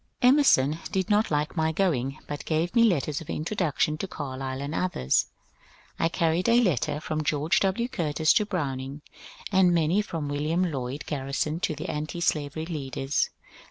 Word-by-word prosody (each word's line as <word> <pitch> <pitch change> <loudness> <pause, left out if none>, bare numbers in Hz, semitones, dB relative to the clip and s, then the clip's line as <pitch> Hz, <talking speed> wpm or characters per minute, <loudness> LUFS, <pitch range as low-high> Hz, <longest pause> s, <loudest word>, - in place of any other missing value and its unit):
Emerson 245 - +5
did 190 +2 -1
not 210 +2 +3
like 150 +2 -1
my 160 -1 +1
going, 135 -8 0
but 145 - -5
gave 165 +3 0
me 235 -1 +5
letters 155 -8 +1
of 160 - -11
introduction 155 -3 -1
to 195 - -3
Carlyle 130 -4 -5
and 140 +2 -4
others. 160 - +1 0.7
I 165 - +2
carried 170 +3 +1
a 235 +1 +6
letter 155 - +1
from 155 0 -3
George 150 +2 +1
W. 200 +5 0
Curtis 160 - +1
to 210 - +2
Browning, 140 -5 -3 0.5
and 185 -3 +4
many 170 +5 +2
from 165 -7 -4
William 150 +5 0
Lloyd 135 +1 -4
Garrison 145 +2 -2
to 160 -3 -1
the 150 - -6
antislavery 155 -1 -2
leaders. 140 -3 -2
155 Hz, 160 wpm, -27 LUFS, 145-180 Hz, 0.7 s, a